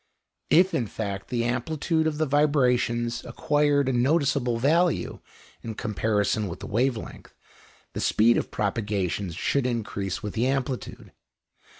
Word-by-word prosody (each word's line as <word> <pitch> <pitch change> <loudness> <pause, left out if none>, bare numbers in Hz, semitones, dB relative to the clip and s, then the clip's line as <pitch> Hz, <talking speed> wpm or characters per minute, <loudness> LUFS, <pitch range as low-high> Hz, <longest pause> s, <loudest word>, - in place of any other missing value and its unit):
If, 180 +4 +5
in 120 - 0
fact, 100 -2 -5
the 120 -2 -1
amplitude 155 +7 0
of 155 -2 -2
the 155 - +1
vibrations 125 -5 +1
acquired 145 -2 +1
a 130 - +1
noticeable 135 -2 +1
value 165 +7 +1 0.4
in 110 -1 -6
comparison 105 -1 0
with 85 - -7
the - - -7
wave 120 +3 +1
length, - - -10 0.6
the - - -4
speed 115 +2 +4
of - - -1
propagation 100 -4 -2
should 125 - 0
increase 100 -5 -3
with 105 - -4
the 120 +3 +1
amplitude. 135 -1 -3
120 Hz, 135 wpm, -26 LUFS, 110-145 Hz, 0.6 s, If